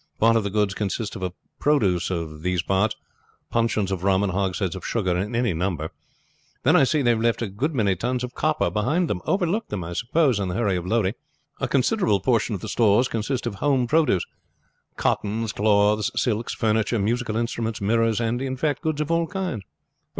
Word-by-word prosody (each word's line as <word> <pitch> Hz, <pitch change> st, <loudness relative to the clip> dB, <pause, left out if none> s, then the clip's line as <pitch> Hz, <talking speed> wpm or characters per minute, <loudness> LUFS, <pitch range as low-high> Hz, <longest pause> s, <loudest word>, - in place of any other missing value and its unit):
Part 115 Hz, +1 st, +5 dB
of 115 Hz, -, +2 dB
the 100 Hz, -, -2 dB
goods 105 Hz, -1 st, +1 dB
consist 105 Hz, +1 st, -3 dB
of 90 Hz, -1 st, -3 dB, 0.3 s
produce 100 Hz, -, +2 dB
of 80 Hz, -4 st, -4 dB
these 90 Hz, 0 st, 0 dB
parts 95 Hz, +3 st, +1 dB, 0.6 s
puncheons 115 Hz, -4 st, +1 dB
of 95 Hz, -2 st, -3 dB
rum 95 Hz, 0 st, +3 dB
and 100 Hz, -, 0 dB
hogsheads 95 Hz, 0 st, -1 dB
of 95 Hz, -, -8 dB
sugar 95 Hz, -6 st, 0 dB
in 100 Hz, +6 st, -2 dB
any 120 Hz, -5 st, +1 dB
number. 80 Hz, -2 st, -2 dB, 0.7 s
Then -, -, +4 dB
I 135 Hz, -, +6 dB
see 145 Hz, +1 st, +1 dB
they 120 Hz, -, +4 dB
have 115 Hz, -1 st, 0 dB
left 115 Hz, 0 st, +1 dB
a -, -, -1 dB
good 130 Hz, +11 st, -2 dB
many 100 Hz, -6 st, +2 dB
tons 125 Hz, +7 st, -2 dB
of 125 Hz, 0 st, -5 dB
copper 155 Hz, +3 st, 0 dB
behind 150 Hz, +12 st, +1 dB
them; 90 Hz, -, -2 dB
overlooked 190 Hz, +3 st, 0 dB
them, 100 Hz, -4 st, -3 dB
I 85 Hz, +1 st, -6 dB
suppose, 125 Hz, -, +1 dB
in 100 Hz, -, -1 dB
the 90 Hz, -, -3 dB
hurry 105 Hz, -4 st, +1 dB
of 90 Hz, 0 st, -3 dB
loading. 110 Hz, -2 st, +1 dB, 0.5 s
A -, -, -1 dB
considerable 135 Hz, -, +2 dB
portion 115 Hz, +1 st, +1 dB
of -, -, -7 dB
the 110 Hz, -, -6 dB
stores 110 Hz, +2 st, +3 dB
consist 115 Hz, +4 st, -2 dB
of 110 Hz, -4 st, -3 dB
home 135 Hz, -4 st, +2 dB
produce 130 Hz, -, +2 dB, 0.7 s
cottons, 110 Hz, +2 st, 0 dB
cloths, 105 Hz, 0 st, +3 dB
silks, 115 Hz, -1 st, -1 dB
furniture, 110 Hz, +1 st, +1 dB
musical 110 Hz, +2 st, -1 dB
instruments, 115 Hz, -1 st, -2 dB
mirrors, 115 Hz, +2 st, +2 dB
and, 120 Hz, +1 st, -1 dB
in 130 Hz, -1 st, -3 dB
fact, 145 Hz, 0 st, -1 dB
goods 155 Hz, -1 st, -1 dB
of 150 Hz, +2 st, -2 dB
all 165 Hz, 0 st, +2 dB
kinds." 185 Hz, -, -3 dB
110 Hz, 200 wpm, -24 LUFS, 100-125 Hz, 0.7 s, I